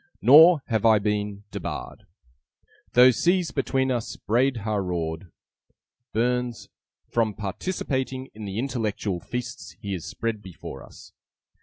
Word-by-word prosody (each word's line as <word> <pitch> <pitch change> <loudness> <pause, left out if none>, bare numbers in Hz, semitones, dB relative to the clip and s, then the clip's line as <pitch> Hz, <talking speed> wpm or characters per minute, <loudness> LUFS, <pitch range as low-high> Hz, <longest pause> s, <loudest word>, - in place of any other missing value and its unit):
Nor 150 +5 +8
have 110 -4 -1
I 110 -1 +6
been 105 0 -2
debarred, - - -6 0.9
Though 125 +1 +8
seas 175 - +1
between 135 -1 0
us 120 -3 -2
braid 125 +4 +1
ha' 105 -2 0
roared, 85 -1 -4 0.8
(BURNS) 125 +1 -1 0.4
from 110 -3 +1
participating 130 - -3
in 110 0 -8
the 100 0 -5
intellectual 110 -7 -2
feasts 120 +4 -6
he 100 -1 -4
has 90 -4 -5
spread 115 -2 -3
before 95 -4 -9
us. - - -15
115 Hz, 125 wpm, -25 LUFS, 105-130 Hz, 0.9 s, Nor